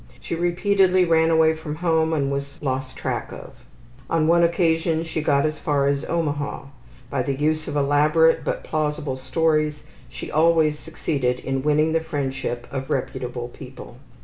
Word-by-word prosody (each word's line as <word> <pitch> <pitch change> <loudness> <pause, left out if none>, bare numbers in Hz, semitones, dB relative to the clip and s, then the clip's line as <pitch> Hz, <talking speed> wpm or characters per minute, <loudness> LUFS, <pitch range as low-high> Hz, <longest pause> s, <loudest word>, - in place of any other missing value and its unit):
She - - -6
repeatedly 185 +2 +2
ran 165 -1 +3
away 160 -1 +4
from 160 -1 -6
home 160 -1 +1
and 140 -3 0
was 140 0 -5
lost 130 -1 -3
track - - -3
of. - - -9 0.6
On 165 -2 +2
one 170 +2 +4
occasion 165 -1 +1
she 160 -1 -3
got 145 -1 +2
as 155 -1 -2
far 145 -2 +1
as 140 +1 0
Omaha. 145 -5 -2 0.5
By 140 - 0
the 135 +2 -1
use 155 +2 0
of - - -4
elaborate, 150 +3 +3
but - - -3
plausible 150 -3 -2
stories 155 +2 0 0.3
she - - -8
always 155 -1 +3
succeeded 135 -6 -2
in 135 0 -2
winning 150 +2 +2
the 165 - +2
friendship 135 -6 -3
of 135 0 -5
reputable 130 -3 -3
people. 125 -1 -11
150 Hz, 160 wpm, -23 LUFS, 140-160 Hz, 0.6 s, away